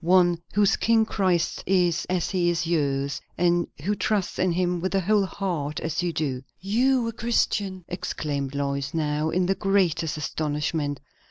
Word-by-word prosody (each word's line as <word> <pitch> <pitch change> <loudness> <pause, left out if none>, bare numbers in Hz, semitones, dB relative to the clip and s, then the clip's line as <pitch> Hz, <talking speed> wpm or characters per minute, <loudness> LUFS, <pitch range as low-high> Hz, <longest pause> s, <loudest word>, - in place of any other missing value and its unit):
One 175 -1 +4 0.2
whose 205 -1 +4
King 225 -1 +3
Christ 185 -6 0
is, 180 -3 +2
as 180 -2 0
he 180 -3 +2
is 170 -1 0
yours; 140 -4 0 0.2
and 175 0 +2 0.2
who 205 +5 +1
trusts 205 -1 -1
in 185 - +2
him 180 0 0
with 185 +2 -2
the 195 - +3
whole 200 +1 +2
heart, 170 -7 -3
as 160 +3 -2
you 175 -1 0
do." 140 -5 -2 0.2
"You 240 +6 +2
a - - -6
Christian!" 205 -5 0
exclaimed 145 -5 -3
Lois 140 +1 -2
now, 150 0 0
in 180 +2 +1
the 190 - +2
greatest 180 -5 +1
astonishment. 150 -1 -2
175 Hz, 165 wpm, -25 LUFS, 155-195 Hz, 0.2 s, One